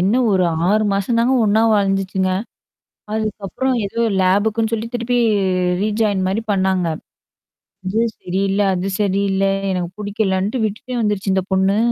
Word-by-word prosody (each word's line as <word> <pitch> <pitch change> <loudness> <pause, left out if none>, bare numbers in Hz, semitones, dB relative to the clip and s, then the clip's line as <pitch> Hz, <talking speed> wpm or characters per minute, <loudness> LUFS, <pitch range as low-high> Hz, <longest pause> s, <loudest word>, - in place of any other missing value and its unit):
என்ன 190 +5 +2 0.2
ஒரு 190 -2 +3 0.2
6 215 +2 +3
மாசம் 200 +4 0
தாங்க 240 +3 +2
ஒண்ணா 215 +1 +3
வாழ்ந்துச்சுங்க. 195 -2 0 0.8
அதுக்கப்புறம் 215 +4 -2
ஏதோ 230 - -4 0.2
லேபக்குன்னு 215 +4 +1
சொல்லி 225 0 -1
திருப்பி 240 +1 0 0.6
ரீஜாயின் 210 -2 0
மாரி 200 +4 -1
பண்ணாங்க. 190 -2 +1 1.0
"இது 215 +4 0 0.2
சரியில்ல, 195 +2 -1
அது 185 +2 -2
சரியில்ல. 195 -1 +1 0.3
எனக்கு 180 -2 -2
பிடிக்கலன்ட்டு" 205 +2 -1
விட்டுட்டே 235 +4 -4
வந்துருச்சு 205 -3 0
இந்த 190 -1 0
பொண்ணு. 190 +1 +2
200 Hz, 125 wpm, -19 LUFS, 190-220 Hz, 1.0 s, ஒரு